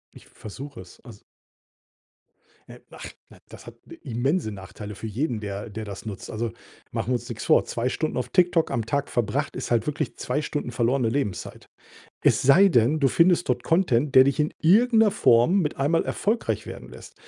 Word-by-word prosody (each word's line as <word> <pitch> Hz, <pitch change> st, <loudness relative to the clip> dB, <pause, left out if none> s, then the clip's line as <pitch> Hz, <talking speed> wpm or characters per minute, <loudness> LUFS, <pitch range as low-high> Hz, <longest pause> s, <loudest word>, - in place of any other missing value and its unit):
Ich -, -, -15 dB
versuche 130 Hz, +4 st, -10 dB
es. 90 Hz, -, -16 dB
Also 115 Hz, -6 st, -14 dB, 1.5 s
Ne, -, -, -13 dB
ach -, -, -10 dB, 0.2 s
na, -, -, -17 dB
das -, -, -13 dB
hat -, -, -10 dB
ne -, -, -11 dB
immense 130 Hz, +3 st, -2 dB
Nachteile 100 Hz, +1 st, -9 dB
für 110 Hz, -, -7 dB
jeden, 120 Hz, +2 st, -2 dB
der 100 Hz, +2 st, -6 dB
der 110 Hz, +2 st, -6 dB
das 100 Hz, +2 st, -9 dB
nutzt. 105 Hz, -3 st, -7 dB
Also 115 Hz, +1 st, -3 dB, 0.4 s
machen -, -, -3 dB
wir -, -, +2 dB
uns 120 Hz, 0 st, -5 dB
nix 115 Hz, -3 st, -6 dB
vor. -, -, +4 dB
2 120 Hz, +2 st, -2 dB
Stunden 155 Hz, +4 st, -3 dB
auf 125 Hz, -, -3 dB
TikTok 175 Hz, -3 st, +2 dB
am 115 Hz, -2 st, -2 dB
Tag 140 Hz, +3 st, -2 dB
verbracht 120 Hz, +5 st, -2 dB
ist -, -, -5 dB
halt 115 Hz, -1 st, +2 dB
wirklich 150 Hz, -, -3 dB
2 150 Hz, -, -2 dB
Stunden 145 Hz, -4 st, -4 dB
verlorene 120 Hz, 0 st, +1 dB
Lebenszeit. 110 Hz, -9 st, -4 dB, 0.5 s
Es -, -, +2 dB
sei 170 Hz, +10 st, +6 dB
denn, 140 Hz, +1 st, +2 dB
du 135 Hz, -, +4 dB
findest 175 Hz, +1 st, +3 dB
dort 125 Hz, -1 st, 0 dB
Content, 150 Hz, -6 st, +1 dB
der 130 Hz, 0 st, +8 dB
dich 140 Hz, +2 st, 0 dB
in 150 Hz, -, 0 dB
irgend 220 Hz, +8 st, +4 dB
'ner 210 Hz, -, +4 dB
Form 170 Hz, -, +3 dB
mit 150 Hz, -, -2 dB
einem 140 Hz, +4 st, 0 dB
Mal 165 Hz, -, +2 dB
erfolgreich 225 Hz, +3 st, -2 dB
werden -, -, -9 dB
lässt. -, -, -13 dB
130 Hz, 200 wpm, -24 LUFS, 115-155 Hz, 1.5 s, der